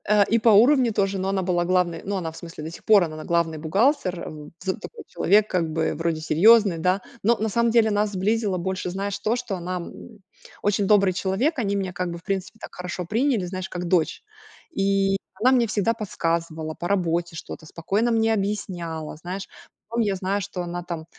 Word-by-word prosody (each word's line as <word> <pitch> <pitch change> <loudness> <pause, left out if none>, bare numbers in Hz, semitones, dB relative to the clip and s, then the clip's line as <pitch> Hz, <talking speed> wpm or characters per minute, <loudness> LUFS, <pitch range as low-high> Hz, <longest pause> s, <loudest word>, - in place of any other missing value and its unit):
Э, 210 -1 +6
и 230 - +3
по 230 - +4
уровню 240 +3 +5
тоже, 195 -1 0
но 190 +1 -1
она 195 -1 0
была 175 -1 0
главной. 180 -2 +1
Ну, 200 0 -3
она, 170 -4 -3
в 160 - -13
смысле, 165 -3 -9
до 160 - -5
сих - - -12
пор 210 -3 +6
она 155 -2 -5
главный 170 -2 0
бухгалтер, 185 - +1
м, 150 -1 -9
такой 195 - -5
человек, 210 +1 +3
как 165 -3 0
бы 160 0 0
вроде 165 0 -1
серьёзный, 195 +4 +5
да, 180 +4 +1 0.2
но 230 +3 +3
на 220 +1 0
самом 235 +2 +2
деле 225 -2 +4
нас 205 0 +1
сблизило 205 0 0
больше, 185 +1 -3
знаешь, 195 +2 -3
то, 220 +2 0
что 245 -5 -3
она, 180 0 -4
м, 170 - -7 0.7
очень 205 -1 +1
добрый 200 -2 +4
человек. 205 - 0
Они 200 -3 0
меня, 190 -2 -2
как 180 0 -2
бы, 170 - -5
в 170 - -15
принципе, 195 +1 -3
так - - -10
хорошо 180 0 -5
приняли, 225 +1 +1
знаешь, 185 +1 -5
как 180 0 -4
дочь. 170 -2 +1 0.6
И 195 0 +2 0.2
она 255 +3 +5
мне 250 -3 +4
всегда 215 +1 +1
подсказывала 165 -6 -2
по 175 - -2
работе 175 -3 0
что-то, 160 - -8
спокойно 200 +9 -1
мне 225 -1 +2
объясняла. 180 -7 -3
Знаешь, 180 +4 -6 0.4
потом 235 +1 0
я 205 -3 +1
знаю, 195 +2 -1
что 190 -2 -5
она 175 0 -5
там, 170 -2 -6
190 Hz, 205 wpm, -24 LUFS, 170-210 Hz, 0.7 s, Э